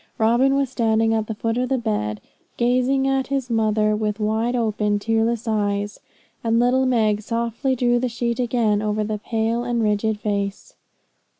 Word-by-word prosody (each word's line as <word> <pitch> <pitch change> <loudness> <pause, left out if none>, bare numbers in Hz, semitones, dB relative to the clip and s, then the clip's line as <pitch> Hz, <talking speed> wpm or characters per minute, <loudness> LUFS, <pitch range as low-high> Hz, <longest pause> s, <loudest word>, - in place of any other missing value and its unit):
Robin 240 +5 +3
was 275 -1 +1
standing 225 -3 +1
at 220 -1 -1
the 220 - -4
foot 225 +2 -1
of 255 - -1
the 265 - +1
bed, 210 - -2 0.4
gazing 255 +3 +2
at 270 -1 0
his 270 -3 -2
mother 215 -1 +2
with 210 -1 -2
wide 220 +3 0
open, 215 -3 0
tearless 225 +2 0
eyes; 205 -1 -1 0.4
and 230 0 +2
little 250 +2 +3
Meg 215 -4 +2
softly 235 +4 -1
drew 240 -1 +2
the 255 0 -1
sheet 235 +1 -2
again 230 -4 +1
over 215 0 -1
the 210 0 -3
pale 225 +2 -1
and 240 -1 -1
rigid 210 0 0
face. 200 -1 -3
225 Hz, 170 wpm, -22 LUFS, 215-245 Hz, 0.4 s, Robin